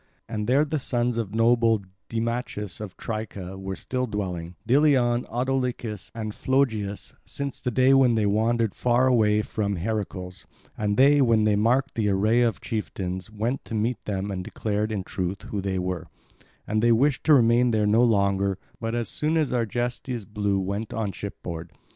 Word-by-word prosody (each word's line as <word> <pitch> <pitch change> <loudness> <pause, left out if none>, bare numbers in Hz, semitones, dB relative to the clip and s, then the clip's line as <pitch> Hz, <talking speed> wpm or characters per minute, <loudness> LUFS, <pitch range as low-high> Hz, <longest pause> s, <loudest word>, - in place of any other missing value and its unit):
And 105 -2 -3
there 140 +5 +4
the 155 0 -2
sons 120 -2 -1
of 110 -2 -4
noble 115 -2 +3 0.3
Deimachus 115 -3 -3
of 100 -4 -7
Tricca 100 -4 -5
were 95 0 -5
still 125 +4 -3
dwelling, 90 -5 -4
Deileon, 125 -3 +3
Autolycus 125 -4 -2
and 110 -2 -4
Phlogius, 110 -8 -1
since 140 -1 -4
the 125 - -1
day 130 +2 +4
when 130 -3 +5
they 110 -2 +2
wandered 110 +1 +1
far 125 +1 +2
away 110 -4 +3
from 100 -2 -2
Heracles; 95 -2 -4 0.3
and 105 -1 -1
they, 140 +2 +6
when 115 -4 +4
they 105 -1 +3
marked 125 +6 +2
the 105 -2 0
array 105 +5 +3
of 115 -3 +1
chieftains, 95 -4 -4
went 110 +5 -2
to 115 - -5
meet 110 +2 -1
them 100 -1 -2
and 95 -1 -3
declared 105 +2 -2
in 100 -3 -2
truth 95 +1 -4
who 100 - -4
they 95 -1 -2
were; 90 -2 -3 0.6
and 110 +1 0
they 120 +1 +4
wished 130 +4 +2
to 155 - +7
remain 120 0 +4
there 110 -2 +2
no 110 +3 +4
longer, 100 -4 +2 0.2
but 115 0 -2
as 120 -1 -1
soon 155 +2 0
as 155 -3 +1
Argestes 120 0 -2
blew 105 -2 -1
went 100 +3 -3
on 110 -3 -1
ship 100 +1 -8
board. 85 -2 -6
110 Hz, 175 wpm, -25 LUFS, 100-120 Hz, 0.6 s, to